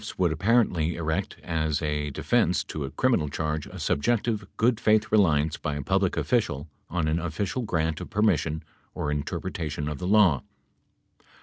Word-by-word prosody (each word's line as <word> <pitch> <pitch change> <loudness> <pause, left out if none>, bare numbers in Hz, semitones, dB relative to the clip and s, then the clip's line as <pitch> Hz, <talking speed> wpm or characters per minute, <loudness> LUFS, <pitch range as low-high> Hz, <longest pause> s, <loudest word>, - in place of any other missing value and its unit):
104 - - -7
would 85 - +3
apparently 90 -3 +2
erect 80 -1 -2
as 80 -2 0
a 75 -2 -1
defense 70 - +1
to 75 - -5
a 70 - -4
criminal 80 - +1
charge 75 0 -2
a - - -10
subjective, 110 +4 0
good 115 0 +2
faith 110 0 +3
reliance 80 -8 +3
by 75 -1 -3
a 70 - -4
public 95 +3 +1
official 85 - 0 0.2
on 85 -2 -1
an 80 +2 +1
official 95 +8 -2
grant 80 -8 -1
of - - -7
permis 105 -5 +3
sion 80 0 -4 0.3
or 75 - -2
interpretation 75 +1 -3
of 75 -2 -4
the 90 - -3
law. 95 -9 +5
80 Hz, 170 wpm, -26 LUFS, 75-105 Hz, 0.3 s, law